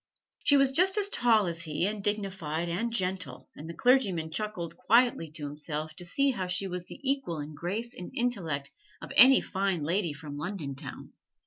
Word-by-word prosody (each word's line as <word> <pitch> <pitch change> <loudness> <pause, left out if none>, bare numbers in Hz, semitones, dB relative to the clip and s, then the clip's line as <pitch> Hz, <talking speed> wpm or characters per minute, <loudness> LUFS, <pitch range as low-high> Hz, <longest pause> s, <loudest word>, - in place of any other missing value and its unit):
She 285 - +5
was 275 -1 +4
just 370 +7 +4
as 405 -1 +1
tall 225 - +3
as 170 -1 -2
he, 160 +1 -1
and 205 0 -2
dignified 190 -6 -2
and 195 +8 -2
gentle: 185 - -2
and 155 +3 -9
the 170 - -7
clergyman 195 -10 +2
chuckled 185 -2 -4
quietly 235 -7 +3
to 155 -2 -5
himself 150 +1 -4
to 175 - -8
see 275 +10 +2
how 190 -7 -3
she 180 +2 0
was 180 -2 -4
the - - -11
equal 270 - -1
in 150 +1 -6
grace 205 +10 -4
and 180 - -8
intellect 165 - -1 0.3
of - - -9
any 260 +4 +8
Fine 190 -4 -1
Lady 170 +1 0
from 145 -1 -8
London 155 -3 -4
town. 135 - -8
185 Hz, 190 wpm, -29 LUFS, 160-230 Hz, 0.3 s, any